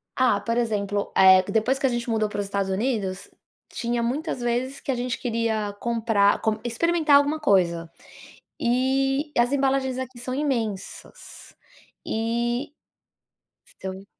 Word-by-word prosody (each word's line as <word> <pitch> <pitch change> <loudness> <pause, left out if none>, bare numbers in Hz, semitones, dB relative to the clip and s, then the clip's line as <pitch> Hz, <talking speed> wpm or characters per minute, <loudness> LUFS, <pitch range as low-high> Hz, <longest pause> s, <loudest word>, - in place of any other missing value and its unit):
Ah, 250 -6 +3
por 230 0 -1
exemplo, 205 -3 -1
eh, 190 -1 +7
depois 245 +5 +1
que 270 - 0
a - - +4
gente 240 0 -3
mudou 220 -2 +1
para 205 - -5
os 205 - -1
Estados 200 -1 -2
Unidos, 195 -3 -2 0.4
tinha 235 -1 -2
muitas 265 +2 -2
vezes 245 +3 -1
que - - -3
a - - -1
gente 245 0 -2
queria 225 -3 -1
comprar, 225 -4 +2
com 220 -1 0
experimentar 305 +5 +2
alguma 290 +2 +1
coisa. 170 - +2 0.7
E 270 +4 +1
as 240 +2 +3
embalagens 270 -2 +1
aqui 260 -1 -6
são 255 +1 -4
imensas. 235 -9 -4 0.5
E 235 +4 -2 1.1
são, 190 +1 -6
235 Hz, 140 wpm, -24 LUFS, 210-265 Hz, 1.1 s, eh